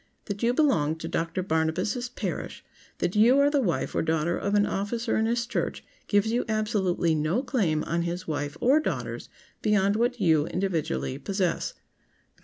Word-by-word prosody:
That 205 -1 -5
you 235 0 +3
belong 245 - +2
to 165 0 -6
Doctor 165 +3 -2
Barnabas' 185 +9 -1
parish, 250 - -5 0.3
that 175 - -1
you 235 +5 +6
are 285 +1 +4
the 285 -2 +2
wife 180 -9 -1
or - - +1
daughter 160 +1 0
of 200 +1 -1
an 205 0 +4
officer 225 +5 -2
in 220 0 +2
his 235 +1 0
church, 245 - -3 0.2
gives 205 +2 +2
you 240 +2 +1
absolutely 205 -6 +1
no 155 - 0
claim 190 - 0
on 170 +1 -1
his 175 +2 -4
wife 145 -1 -3
or 270 +5 +4
daughters 310 - -4 0.3
beyond 205 -2 +2
what 240 +2 0
you, 160 -5 +3
individually, 165 -7 -2
possess. 185 +3 -1
195 Hz, 170 wpm, -27 LUFS, 165-235 Hz, 0.3 s, you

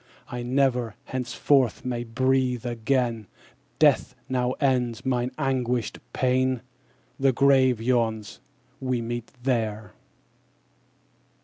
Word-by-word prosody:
'I 120 0 -4
never, 125 -3 +1
henceforth, 130 0 +1
may 120 -1 -2
breathe 125 +1 +1
again; 120 -2 0 0.5
Death 145 -4 +3
now 125 -1 0
ends 125 -4 0
mine 125 -1 0
anguished 125 -3 -1
pain. 130 -1 +1 0.6
The 135 0 +4
grave 130 -2 +4
yawns, 115 -3 0 0.4
we 130 -2 -1
meet 120 0 -5
there.' 110 -5 -1
125 Hz, 95 wpm, -26 LUFS, 120-130 Hz, 0.6 s, The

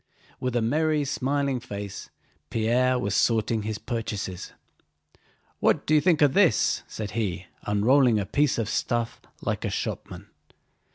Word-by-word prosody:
With 125 -1 -2
a 120 - +2
merry, 150 +4 +1
smiling 140 0 0
face 100 -4 -7 0.4
Pierre 125 +3 +2
was 100 -4 -1
sorting 115 0 +2
his 105 0 -3
purchases. 105 -6 -4 1.1
"What - - +2
do 155 - +1
you 150 - +5
think 165 -2 +3
of 140 -2 +4
this?" 190 -3 +3
said 105 -2 -6
he, 100 -4 -2 0.2
unrolling 115 +3 +4
a 100 - -2
piece 145 +3 +1
of 115 -3 -1
stuff 120 +2 -1 0.2
like - - -2
a - - -1
shopman. - - -5
120 Hz, 145 wpm, -26 LUFS, 105-140 Hz, 1.1 s, you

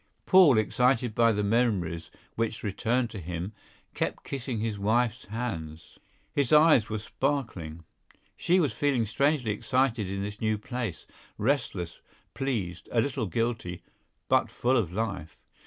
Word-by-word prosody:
Paul, 180 - +7
excited 125 +2 +2
by 115 +1 +4
the 105 -1 0
memories 100 -7 0 0.2
which 115 -1 -2
returned 115 +4 0
to 105 - -6
him, 90 +3 -5 0.4
kept - - -2
kissing 130 -4 -4
his 110 -2 -2
wife's 115 +3 +1
hands. 85 -9 -6 0.3
His 140 -4 0
eyes 150 -7 +6
were 110 - -2
sparkling. 105 - -3 0.5
She 180 +2 +2
was 150 -6 +1
feeling 135 -5 +1
strangely 135 +2 +1
excited 115 -1 0
in 100 0 -3
this 105 +1 -6
new 110 -1 +1
place, 115 -4 -5 0.3
restless, 105 - -1 0.3
pleased, 105 -11 -3
a 120 - +2
little 130 -3 0
guilty, 110 -2 -2 0.4
but - - +3
full 125 +2 +1
of 105 -9 +1
life. 95 -5 -4
115 Hz, 140 wpm, -28 LUFS, 100-125 Hz, 0.5 s, Paul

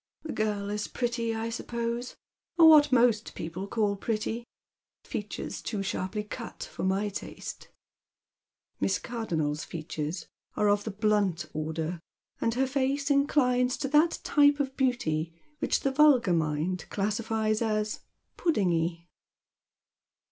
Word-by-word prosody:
The 315 - -5
girl 205 -2 -1
is 210 0 -2
pretty, 235 -2 -1
I 225 +1 -3
suppose, 235 +1 -3 0.4
or 330 -2 +9
what 295 -3 +7
most 235 -3 +3
people 180 +4 -5
call 205 -1 +1
pretty. 225 +3 -3 0.6
Features - - -5
too 205 -3 -3
sharply 195 +2 -2
cut 230 +2 -7
for - - -7
my 195 +2 +1
taste." 200 - -7 1.1
Miss - - +1
Cardonnel's 160 -11 -2
features 160 +1 -5 0.3
are 210 -1 +3
of 205 0 +2
the - - -2
blunt 205 -5 +1
order, 160 +2 -3 0.4
and 230 0 0
her 265 +2 +2
face 275 +2 0
inclines 255 -2 +3
to 270 - -2
tliat 305 +4 +4
typo 290 -1 +4
of 270 -1 -7
beauty 165 - 0 0.2
which - - +1
the 275 - +1
vulgar 265 -9 +5
mind 160 +3 0
classifiea 215 +1 0
cs 215 -1 -1 0.2
" - - -48
puddingy." 170 - +1
215 Hz, 130 wpm, -28 LUFS, 185-250 Hz, 1.1 s, or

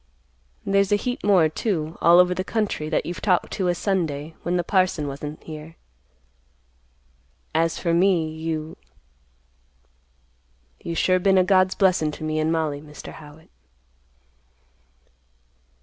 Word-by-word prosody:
There's 200 0 +2
a - - +5
heap 245 +4 -3
more, 190 -6 +4
too, 160 -1 -3
all 170 +1 +6
over 180 0 +5
the 185 - -3
country 205 -8 -2
that 155 - 0
you've 175 +1 -6
talked 185 -4 +1
to 190 -3 -1
a 175 - +1
Sunday, 165 -6 -2
when 175 +1 -1
the 175 - 0
parson 185 -5 +1
wasn't 145 +2 -7
here. 155 +1 -9 1.8
As 165 +1 +1
for 170 -2 -1
me, 175 -2 +3
you—you 65 - -11
sure 185 +2 +2
been 190 +1 +3
a 185 - +5
God's 185 0 +3
blessin' 185 -5 +2
to - - -9
me 155 0 -1
and 155 +1 +1
Mollie, 155 -3 -1
Mr. 150 0 -11
Howitt." 150 +1 -14
160 Hz, 135 wpm, -23 LUFS, 145-185 Hz, 1.8 s, all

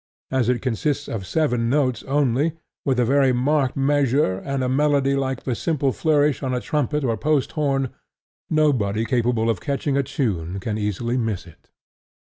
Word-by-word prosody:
As 130 -3 +1
it 125 -3 0
consists 145 +3 -1
of 95 -5 -5
seven 120 - +1
notes 130 -4 +1
only, 140 +2 +1 0.3
with 130 -3 +1
a 120 - +3
very 135 +1 +3
marked 135 +2 +1
measure, 135 -7 +2
and 140 +2 -3
a - - 0
melody 140 0 +2
like 135 -2 -2
a 130 - 0
simple 140 +1 0
flourish 150 0 +2
on 130 -2 -1
a - - 0
trumpet 150 +1 -1
or 115 -3 +1
post 145 +4 0
horn, 135 -4 0 0.6
nobody 120 -9 +2
capable 120 -2 +1
of 110 -6 0
catching 140 0 -1
a - - +4
tune 105 - -2
can 105 +2 -3
easily 110 +4 -1
miss 110 -6 -2
it. 85 -3 -18
130 Hz, 170 wpm, -22 LUFS, 115-145 Hz, 0.6 s, a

